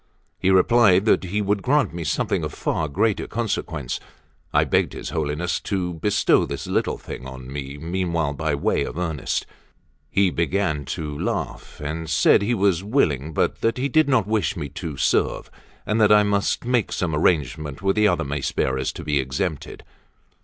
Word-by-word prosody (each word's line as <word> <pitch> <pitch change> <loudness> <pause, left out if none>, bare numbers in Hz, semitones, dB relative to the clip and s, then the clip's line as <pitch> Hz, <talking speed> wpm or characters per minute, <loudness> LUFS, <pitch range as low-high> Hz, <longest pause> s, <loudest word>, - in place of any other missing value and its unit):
He 95 - +1
replied 95 0 +5
that 110 - +3
he 105 +4 -1
would 100 0 0
grant 145 - +2
me 85 -1 -4
something 75 - 0
of - - -3
far 80 - -1
greater 105 +9 0
consequence. 85 - -3 0.5
I - - +4
begged - - +1
his - - -6
Holiness 80 +3 -1
to 90 -3 -2
bestow 90 +6 +2
this - - -5
little - - 0
thing 65 - -8
on 65 0 -9
me 70 0 -6
meanwhile 85 -2 -1
by 75 +1 -1
way 70 - 0
of - - -6
earnest. 80 -5 -2 0.6
He 100 -2 +2
began 85 -4 0
to 75 +1 -5
laugh, - - -4
and 80 +2 -4
said 80 - +4
he 115 +4 +1
was 95 -3 +2
willing, 80 - +1
but - - 0
that 115 +2 +1
he 135 +3 -1
did 155 +2 +3
not 130 -7 +3
wish 105 -6 0
me 75 - -4
to 80 0 -6
serve, - - 0 0.3
and 110 +1 +1
that 105 -1 +5
I 105 0 +7
must 100 +2 0
make 125 -3 +1
some 85 -4 -1
arrangement 75 0 0
with 95 0 +2
the 105 0 +4
other - - +1
mace 70 0 -2
bearers 65 0 0
to - - -8
be 75 -1 +1
exempted. 70 +4 -3
85 Hz, 180 wpm, -23 LUFS, 75-100 Hz, 0.6 s, I